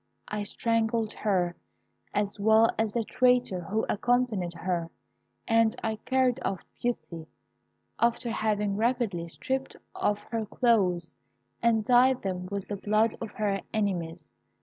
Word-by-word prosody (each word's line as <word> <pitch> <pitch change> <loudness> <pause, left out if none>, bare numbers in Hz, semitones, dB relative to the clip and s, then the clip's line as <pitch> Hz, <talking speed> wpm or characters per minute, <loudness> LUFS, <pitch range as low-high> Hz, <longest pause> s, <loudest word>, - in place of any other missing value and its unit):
I 210 0 -3
strangled 225 +1 0
her, 180 -5 0 0.6
as 205 0 -1
well 220 +2 +5
as 220 -1 +1
the 235 - 0
traitor 250 -5 +2
who 205 +6 -1
accompanied 215 -6 0
her, 170 -1 -2 0.6
and 225 0 +3
I 220 -1 -1
carried 260 +1 +1
off 190 - -3 0.2
Beauty, 170 -9 -3 0.7
after 235 0 +1
having 210 -2 0
rapidly 225 -7 0
stripped 265 +10 -3 0.2
off 205 - +1
her 225 -2 -2
clothes 190 -8 +1 0.5
and 230 -2 +3
dyed 250 +2 +4
them 180 -2 -3
with 200 -1 -4
the 205 - -3
blood 215 +3 +2
of 225 - -4
her 200 -2 -1
enemies. 175 -6 -2
215 Hz, 130 wpm, -28 LUFS, 195-235 Hz, 0.7 s, well